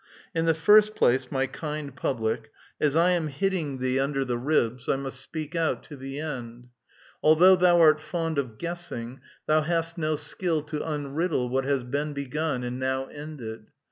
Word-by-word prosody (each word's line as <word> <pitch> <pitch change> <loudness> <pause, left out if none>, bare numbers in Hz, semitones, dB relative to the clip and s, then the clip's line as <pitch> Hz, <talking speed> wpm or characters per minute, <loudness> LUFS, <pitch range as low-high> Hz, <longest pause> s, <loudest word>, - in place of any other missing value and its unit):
In 165 0 0
the 165 -1 +3
first 210 +5 +5
place, 125 +1 +2
my 135 -1 +1
kind 150 -1 -5
public, 115 -4 -2 0.3
as 150 -1 +2
I 170 +2 +4
am 170 -3 +1
hitting 150 -1 -1
thee 130 0 0
j - - +2
10 - - +3
A - - -2
VITAL - - -5
QUESTION. - - -5
tinder 135 -1 0
the 120 -2 -1
ribs, 125 -3 0
I - - +4
must 135 -1 -4
speak 155 +2 -6
out 165 -1 0
to 150 - -10
the 135 +1 -6
end; 125 -5 -6 0.5
although 170 +5 +7
thou 180 -1 +5
art 155 -2 +6
fond 165 -1 -2
of 120 -6 -4
guessing, 135 -8 -5 0.2
thou 155 0 +3
hast 165 +1 -1
no 155 -1 +1
skill 155 +2 -2
to 150 0 -4
unriddle 150 -2 -1
what 135 +1 0
has 135 -2 +1
been 145 +4 -2
begun 140 -1 -2
and 125 +1 -4
now 130 0 -1
ended. 135 -8 -8
145 Hz, 200 wpm, -26 LUFS, 130-160 Hz, 0.5 s, although